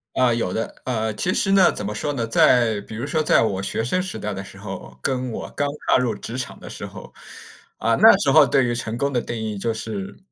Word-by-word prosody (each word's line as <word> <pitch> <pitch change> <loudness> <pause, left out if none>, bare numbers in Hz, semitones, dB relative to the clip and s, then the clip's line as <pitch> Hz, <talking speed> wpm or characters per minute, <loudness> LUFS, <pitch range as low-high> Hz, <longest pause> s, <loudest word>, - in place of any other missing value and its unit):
呃， 125 -2 +3
有 115 -6 -1
的， 115 - -5
呃， 110 -3 -1
其 175 - 0
实 195 - +1
呢， 190 -2 +5
怎 105 - -5
么 105 - -3
说 145 +7 -2
呢？ 120 -4 -2
在 115 -2 +3
比 110 - -10
如 120 +5 -4
说 155 +1 0
在 130 - +4
我 100 -3 -1
学 110 - -2
生 185 +10 0
时 190 - -2
代 105 -1 -4
的 100 +1 -6
时 - - -13
候， 65 -1 -9
跟 130 -2 -1
我 - - -5
刚 145 - -1 0.2
踏 - - +5
入 120 -4 0
职 115 +3 -6
场 130 - -3
的 - - -11
时 - - -8
候， - - -12 0.6
啊， - - +1
那 - - +7
时 - - +2
候 - - +7
对 135 -3 +2
于 120 - 0
成 115 -1 -1
功 140 +2 -1
的 120 - +1
定 120 - -5
义 110 -1 -4
就 115 +4 -1
是 110 -3 -5
115 Hz, 275 characters per minute, -22 LUFS, 105-130 Hz, 0.6 s, 那